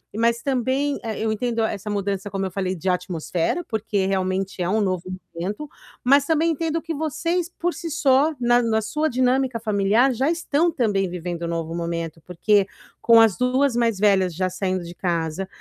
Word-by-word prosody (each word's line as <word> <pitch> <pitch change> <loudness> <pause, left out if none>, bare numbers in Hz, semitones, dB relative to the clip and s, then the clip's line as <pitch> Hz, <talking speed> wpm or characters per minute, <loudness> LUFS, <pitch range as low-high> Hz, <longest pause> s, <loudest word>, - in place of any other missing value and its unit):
mas 230 +1 +1
também 270 +2 0
eh, 220 -2 -4
eu 220 0 0
entendo 230 +1 -1
essa 210 -1 -3
mudança 200 -1 -2
como 195 -1 -2
eu 190 - -4
falei, 185 0 -2
de 180 +2 -2
atmosfera, 180 - -1
porque 215 -3 -1
realmente 190 0 -1
é 175 - 0
um 215 +3 +2
novo 185 -3 -1 0.3
momento, 205 - -4 0.3
mas 275 +2 +5
também 320 +2 +2
entendo 325 +1 -1
que 330 0 -4
vocês, 320 +3 -1
por 350 +1 0
si 340 -2 -6
só, 285 0 +3
na 240 0 +4
na 220 -2 +1
sua 300 +8 -1
dinâmica 255 -1 +1
familiar, 215 +4 +2
já 265 +5 +1
estão 335 0 +1
também 205 - 0
vivendo 175 -1 -5
um - - -2
novo 165 -1 -3
momento, 170 -1 -4
porque 195 +3 +2 0.3
com 230 -1 +7
as 220 -4 +4
2 255 +1 +2
mais 230 -4 +1
velhas 190 -3 +3
já 185 +2 0
saindo 185 0 -2
de 170 0 -8
casa 170 0 -2
220 Hz, 185 wpm, -23 LUFS, 185-265 Hz, 0.3 s, com